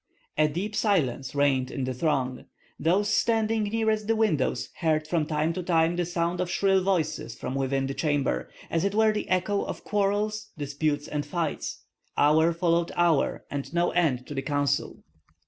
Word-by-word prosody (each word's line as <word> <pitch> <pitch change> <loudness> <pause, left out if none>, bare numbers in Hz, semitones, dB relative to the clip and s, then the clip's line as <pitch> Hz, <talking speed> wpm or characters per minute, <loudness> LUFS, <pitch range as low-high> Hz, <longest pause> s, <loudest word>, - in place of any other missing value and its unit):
A 155 0 +4
deep 190 +8 -3
silence 145 - 0
reigned 135 -3 +2
in 135 - -4
the 130 0 -2
throng. 130 -2 -1 0.3
Those 185 +7 +2
standing 225 -1 +2
nearest 215 0 0
the 225 - +2
windows 160 - +1
heard 155 -2 +1
from 155 -2 0
time 155 +1 0
to 185 - -3
time 170 -1 +2
the 175 -1 -1
sound 170 0 -1
of 180 - -2
shrill 195 0 +2
voices 155 -10 -1
from 130 - -5
within 135 0 0
the 135 - -3
chamber, 145 - 0 0.2
as 165 0 +1
it 200 +1 0
were 220 0 +5
the 210 - -3
echo 185 +2 +1
of - - -5
quarrels, 210 +1 -1
disputes, 145 0 -1
and 150 -1 -2
fights. 155 +1 -3 0.3
Hour 160 +3 +4
followed 170 0 +1
hour, 170 -4 +2
and 140 -1 -4
no 175 0 +2
end 140 -8 +1
to - - -7
the 135 - -2
council. 145 0 -1
165 Hz, 175 wpm, -27 LUFS, 145-195 Hz, 0.3 s, were